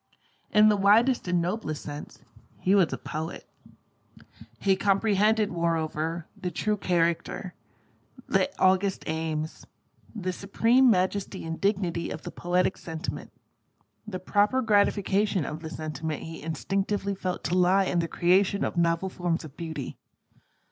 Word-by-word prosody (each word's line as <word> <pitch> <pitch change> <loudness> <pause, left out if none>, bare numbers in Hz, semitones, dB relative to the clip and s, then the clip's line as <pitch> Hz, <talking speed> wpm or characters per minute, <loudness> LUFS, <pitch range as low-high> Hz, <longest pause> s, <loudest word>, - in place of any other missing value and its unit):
In 215 0 +6
the 210 - +4
widest 215 +5 +4
and 180 -1 +2
noblest 170 -3 -3
sense, 145 0 -8 0.3
he 190 - +1
was 190 -5 +4
a - - -2
poet. 160 +2 -6 1.1
He 195 -1 +3
comprehended, 205 +2 +2
moreover, 165 -1 -1
the 180 - -4
true 210 +5 -1
character, 175 0 -1 0.7
the - - +2
august 190 +1 +2
aims, 160 -1 -3 0.5
the 185 -3 -3
supreme 230 +7 +3
majesty 190 -2 0
and 165 0 -5
dignity 190 -4 0
of 155 - -6
the - - -6
poetic 180 +1 0
sentiment. 160 -1 -6 0.8
The 195 -3 -4
proper 210 +7 +2
gratification 200 -3 +2
of 150 - -5
the 160 -1 -7
sentiment 155 -1 -4
he 160 0 -8
instinctively 195 +6 -2
felt 185 -2 -4
to 175 - 0
lie 185 +2 +4
in 180 - 0
the 165 - 0
creation 190 +4 +2
of - - -4
novel 170 +2 +2
forms 175 -3 -2
of 145 -2 -12
Beauty. 160 -6 -6
180 Hz, 135 wpm, -27 LUFS, 165-200 Hz, 1.1 s, In